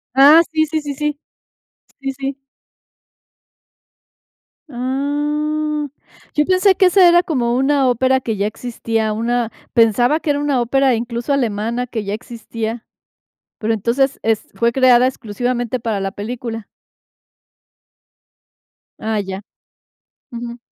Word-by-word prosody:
Ah, 290 +5 +8
sí, 315 -1 +2
sí, 315 0 -2
sí, 290 -1 -4
sí. 295 +1 -2 0.8
Sí, 270 0 -3
sí. 275 0 -5 2.3
Ah, 295 +4 -1 0.5
yo 300 - +3
pensé 375 +2 +4
que 380 - +4
ese 365 0 +6
era 345 +1 +5
como 240 -8 0
una 270 +1 +2
ópera 260 +2 +2
que 225 -4 -3
ya 200 - 0
existía, 225 -1 -2
una, 230 +1 -1 0.2
pensaba 240 +5 +3
que 320 - -4
era 285 0 +2
una 285 -4 +1
ópera, 265 +2 +2
incluso, 235 +3 -2
alemana, 235 -1 -1
que 230 -3 -4
ya 200 0 -3
existía. 225 +1 -6 0.7
Pero 225 +1 -1
entonces, 245 +6 0
es 220 -1 0
fue 235 0 +2
creada 255 -1 +5
exclusivamente 245 +1 -2
para 220 -4 -2
la 195 0 -2
película. 225 +1 -6 2.3
Ah, 220 0 -2
ya. 190 -1 -5 0.9
Ujú. 235 0 -7
245 Hz, 120 wpm, -18 LUFS, 225-285 Hz, 2.3 s, Ah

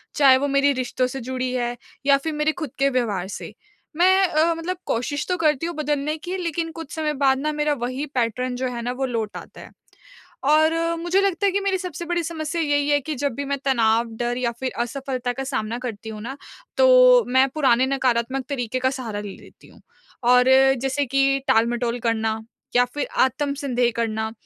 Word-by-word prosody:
चाहे 270 -3 +6
वो 285 +2 -1
मेरी 280 +1 +3
रिश्तों 255 0 -1
से 270 +1 -6
जुड़ी 255 -1 -2
है, 240 -1 -1 0.3
या 280 -1 +5
फिर 315 +3 -4
मेरे 300 +1 +1
खुद 280 - -5
के 275 0 +3
व्यवहार 215 -8 -1
से। - - -9 0.4
मैं 375 +2 +5
अ, 330 +1 +2
मतलब 350 +3 -4
कोशिश 285 +5 -2
तो 360 - +1
करती 305 -2 +1
हूँ 340 0 -4
बदलने 300 0 -1
की, 360 +4 -5
लेकिन 335 -2 -3
कुछ 325 -3 -8
समय 310 -1 -1
बाद 265 -1 +4
ना, 305 +2 -1
मेरा 300 0 +1
वहीं 260 +4 -4
पैटर्न 250 +1 -1
जो 255 +1 -2
है 235 - -4
ना, 240 +1 -2
वो 265 +2 -2
लौट 225 -4 -3
आता - - -11
है। - - -12 0.8
और 315 +1 +4 0.3
मुझे 350 +3 +1
लगता 395 0 0
है 395 - +3
कि 400 - +1
मेरी 390 -1 0
सबसे 360 -2 -6
बड़ी 345 0 -1
समस्या 325 0 -3
यही 290 -1 +1
है 290 0 +4
कि 305 +3 -4
जब 280 0 -2
भी 285 - -4
मैं 280 0 -1
तनाव, 230 -3 +3
डर 240 0 -1
या 240 -2 0
फिर 260 -1 -2
असफलता 250 0 -3
का 270 - -4
सामना 230 -4 -2
करती 225 -3 -6
हूँ 215 -1 -7
ना, 265 +5 -6 0.4
तो - - +7
मैं 260 +2 +4
पुराने 260 -4 +3
नकारात्मक 260 -1 0
तरीके 255 -3 -2
का 260 +1 +2
सहारा 235 -6 -5
ले 205 -2 -7
लेती - - -18
हूँ। - - -19 0.5
और 250 0 +5 0.4
जैसे 270 +2 0
कि 275 +1 +2
टाल-मटोल 235 +1 +1
करना 225 -1 -1 0.4
या 245 - +6
फिर 290 - -2
आत्मसन्देह 270 -3 +1
करना 220 -1 -2
270 Hz, 200 wpm, -23 LUFS, 245-310 Hz, 0.8 s, तो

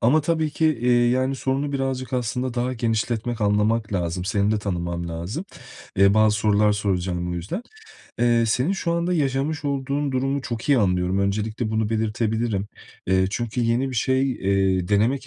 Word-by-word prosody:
ama 140 +7 +4
tabii 160 0 0
ki, 155 -3 +1
iii, 120 0 +3
yani, 130 +2 +1
sorunu 135 +2 -1
birazcık 135 -1 -2
aslında 125 0 -2
daha 125 +1 -1
genişletmek, 115 0 -1
anlamak 105 +1 +1
lazım. 90 -1 -2
Seni 100 0 +1
de 105 - +1
tanımam 85 -3 -3
lazım. 85 - -5 0.5
Eee, 100 +1 +5
bazı 110 -1 +4
sorular 105 0 +3
soracağım 90 -3 -1
bu - - -3
yüzden. 100 - -4 0.6
Eee, 120 -1 +3
senin 125 - +1
şu 170 -3 -1
anda 170 +1 0
yaşamış 145 0 -1
olduğun 140 0 -1
durumu 135 +2 0
çok 120 +2 -5
iyi 140 -3 +5
anlıyorum. 90 -1 +1
Öncelikle 110 +3 -1
bunu 110 -1 0
belirtebilirim. 110 -1 -1 0.4
Eee, 95 0 +3
çünkü 120 +1 -2
yeni 120 +3 +1
bir - - -6
şey, 130 +2 +1
eee, 95 -3 +1
denemek 115 +7 +1
115 Hz, 165 wpm, -23 LUFS, 100-135 Hz, 0.6 s, Eee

